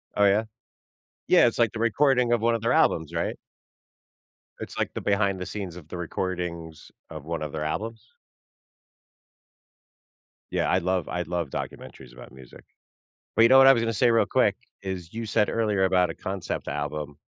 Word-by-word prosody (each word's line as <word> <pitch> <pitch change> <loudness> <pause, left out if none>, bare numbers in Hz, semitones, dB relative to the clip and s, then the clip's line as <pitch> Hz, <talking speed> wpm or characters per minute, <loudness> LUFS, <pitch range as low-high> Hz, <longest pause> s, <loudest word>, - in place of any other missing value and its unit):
Oh, 100 - +4
yeah? 100 +2 +3 0.8
Yeah, - - +6
it's 120 - -2
like 115 -3 +3
the 110 - -7
recording 125 +1 +2
of 120 - +2
one 115 +1 +2
of 115 - -4
their 115 +3 +1
albums, 80 -9 +2
right? - - -2 1.2
It's, - - -8
like, - - -2
the - - -5
behind 100 -1 +1
the 90 - -4
scenes 95 -5 -6
of 85 -4 -12
the 90 - -7
recordings 85 -2 -5 0.2
of 80 -3 -9
one 85 0 -4
of 75 - -5
their 75 0 -4
albums? 115 +8 -5 2.4
Yeah, - - 0
I - - +3
love 90 -1 -1
I 90 - -3
love 85 -3 -3
documentaries - - -8
about - - -13
music. 65 -2 -14 0.7
But, 115 - +5
you 115 - +6
know 130 - +7
what 135 - +8
I 135 - +9
was 115 - 0
gonna 115 0 -1
say, 120 +4 +3
real 115 - +3
quick, - - +2 0.3
is 95 -3 -6
you 115 +1 -4
said 105 0 +1
earlier 105 -4 0
about 90 -2 +2
a - - -6
concept 95 -2 -5
album. 75 +1 -4
95 Hz, 185 wpm, -25 LUFS, 85-115 Hz, 2.4 s, I